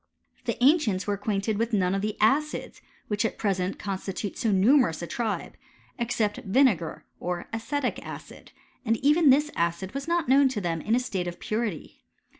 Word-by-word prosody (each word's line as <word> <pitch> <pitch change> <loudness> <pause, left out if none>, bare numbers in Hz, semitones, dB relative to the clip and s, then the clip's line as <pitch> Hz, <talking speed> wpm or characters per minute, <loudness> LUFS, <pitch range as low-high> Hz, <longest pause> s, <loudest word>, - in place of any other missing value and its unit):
The 235 - -1
ancients 250 - +3
were 205 - 0
acquainted 205 +1 -1
with 230 0 -1
none 185 -3 +2
of 195 - 0
the 210 +1 -3
acidt 290 +8 +1 0.3
which 210 0 0
at 225 - -2
present 190 -3 -1
constitute 195 0 -4
so 225 - -1
numerous 200 - +3
a - - -2
tribe, 220 +4 -3 0.5
ex 240 +1 -1
cept 210 -2 0
vinegar, 195 - +1
or 175 -1 -4
acetic 255 +4 -2
acid; - - -10 0.3
and 225 -2 +1
even 300 +1 +5
this 295 +3 +4
acid 170 +3 -1
was 275 +3 -5
not 340 -2 +1
known 270 +2 +5
to 245 -5 -3
them 170 -4 -2
in 220 +7 +1
a - - +3
state 190 -8 -3
of 175 - -6
purity. 215 -7 -4
215 Hz, 180 wpm, -26 LUFS, 190-255 Hz, 0.5 s, even